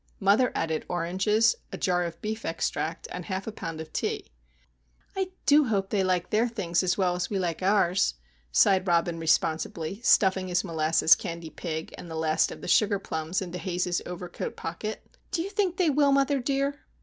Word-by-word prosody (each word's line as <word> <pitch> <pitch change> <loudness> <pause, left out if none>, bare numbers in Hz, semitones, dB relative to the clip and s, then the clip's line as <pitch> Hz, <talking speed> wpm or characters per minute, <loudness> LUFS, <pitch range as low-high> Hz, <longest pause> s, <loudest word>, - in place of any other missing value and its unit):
Mother 205 +6 +4
added 160 -1 -1
oranges, 190 +6 +2 0.2
a - - -5
jar 180 -2 +1
of 170 -1 -6
beef 220 +1 -3
extract, 165 0 -2
and 180 -1 -6
half 190 0 -3
a 220 - -4
pound 165 -6 -6
of 160 0 -8
tea. - - -3 0.8
"I 380 -1 -1 0.2
do 295 0 +6
hope 200 -5 -1
they 205 - +1
will 190 - +2
like 180 -1 0
their 220 +3 +3
things 190 -7 0
as 185 -1 0
well 185 -3 +2
as 180 0 -2
we 200 - -1
like 175 -3 -2
ours," 185 - +2 0.4
sighed 190 - +4
Robin 170 -1 +1
responsibly, 160 +4 0
stuffing 190 -5 +3
his 180 0 +1
molasses 160 -2 +4
candy 170 -1 -4
pig 160 0 -5
and 175 - -9
the 160 - -6
last 160 0 +1
of - - -9
the - - -7
sugar 205 +2 +3
plums 160 0 -3
into 180 0 -6
Haze's 180 -1 -1
overcoat 180 0 -6
pocket. 210 +6 -5 0.2
"Do 335 - -1
you 395 - -6
think 390 -4 0
they 345 -5 +3
will, 285 0 +3
mother 275 0 +3
dear?" 275 +2 -2
185 Hz, 190 wpm, -27 LUFS, 170-215 Hz, 0.8 s, do